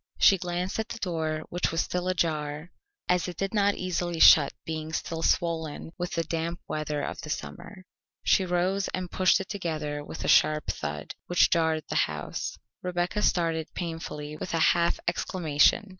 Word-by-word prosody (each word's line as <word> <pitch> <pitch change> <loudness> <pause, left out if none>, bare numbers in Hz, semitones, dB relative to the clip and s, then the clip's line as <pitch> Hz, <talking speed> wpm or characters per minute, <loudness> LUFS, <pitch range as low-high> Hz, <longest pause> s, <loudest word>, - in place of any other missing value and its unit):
She 195 -2 +6
glanced 180 +2 -2
at 220 +1 -2
the - - -5
door, 160 -6 -2
which 175 +1 -1
was 165 +1 +1
still 180 0 -2
ajar, 155 -2 -1 0.4
as 180 -1 +2
it 180 - -6
did 195 +1 -2
not 205 -1 +3
easily 175 -2 -2
shut, 150 -3 +8
being 160 0 -4
still 165 0 -3
swollen 165 -2 0
with 175 -1 -4
the 165 - 0
damp 165 +1 -3
weather 150 -1 -2
of - - -4
the - - -8
summer. 130 - -6 0.4
She 195 - +4
rose 185 +2 0
and 185 -1 -5
pushed 185 0 +4
it 190 - -6
together 155 -7 -3
with 155 - -7
a - - -1
sharp 155 0 +4
thud, 75 0 -5
which 175 - +4
jarred 160 -2 +2
the - - +1
house. - - -5 0.2
Rebecca 180 +3 -1
started 165 -5 +1
painfully 160 -3 -5
with 160 - -4
a - - +1
half 170 0 +1
exclamation. 175 +2 +2
170 Hz, 175 wpm, -27 LUFS, 155-180 Hz, 0.4 s, shut